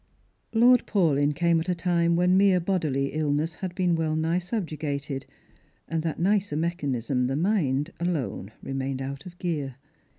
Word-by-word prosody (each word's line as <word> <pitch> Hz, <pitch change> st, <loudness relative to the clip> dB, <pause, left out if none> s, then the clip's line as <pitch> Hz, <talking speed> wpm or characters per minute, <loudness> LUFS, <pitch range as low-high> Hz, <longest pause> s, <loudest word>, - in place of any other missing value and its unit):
Lord 245 Hz, +2 st, +5 dB
Paulyn 150 Hz, -7 st, +2 dB
came 170 Hz, +1 st, +3 dB
at 165 Hz, +3 st, -4 dB
a 180 Hz, -, +1 dB
time 170 Hz, -1 st, +2 dB
when 180 Hz, +1 st, +3 dB
mere 190 Hz, -1 st, +5 dB
bodily 155 Hz, -7 st, -1 dB
illness 155 Hz, +1 st, 0 dB
had 180 Hz, +1 st, -6 dB
been 180 Hz, -2 st, +2 dB
well 160 Hz, -1 st, 0 dB
nigh 160 Hz, +3 st, +1 dB
subjugated, 155 Hz, -, -4 dB, 0.6 s
and 165 Hz, -1 st, -1 dB
that 160 Hz, -1 st, -3 dB
nicer 195 Hz, -2 st, +1 dB
mechanism, 140 Hz, -6 st, -1 dB
the 135 Hz, -, -1 dB
mind, 155 Hz, -4 st, +1 dB
alone 155 Hz, -, -2 dB
remained 135 Hz, 0 st, -3 dB
out 140 Hz, +4 st, -6 dB
of 175 Hz, 0 st, -12 dB
gear. 150 Hz, -8 st, -3 dB
165 Hz, 155 wpm, -26 LUFS, 140-180 Hz, 0.6 s, Lord